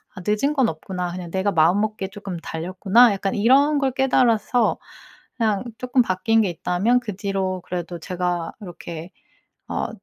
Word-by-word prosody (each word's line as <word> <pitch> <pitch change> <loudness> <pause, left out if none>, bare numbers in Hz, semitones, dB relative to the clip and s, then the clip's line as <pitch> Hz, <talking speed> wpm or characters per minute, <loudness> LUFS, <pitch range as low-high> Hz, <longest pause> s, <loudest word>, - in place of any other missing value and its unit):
'아 185 - -8
늦은 215 +8 +1
건 265 -5 +2
없구나. 180 +2 -4
그냥 175 -1 -7
내가 190 +2 0
마음먹기에 195 +4 +1
쪼끔 195 -3 -7
달렸구나.' 190 +9 +3
약간 195 0 -2
이런 275 +7 +4
걸 270 -1 +1
깨달아서 245 -3 +2 0.6
그냥 215 -3 +1
쪼끔 250 0 +2
바뀐 225 +3 +2
게 200 - +1
있다면 185 +8 +1
그 210 -6 -6
뒤로 190 -2 -2
그래도 175 -1 -5
제가 175 -1 -3
이렇게 170 -1 -8 0.6
어 - - -2
195 Hz, 315 characters per minute, -22 LUFS, 180-230 Hz, 0.6 s, 이런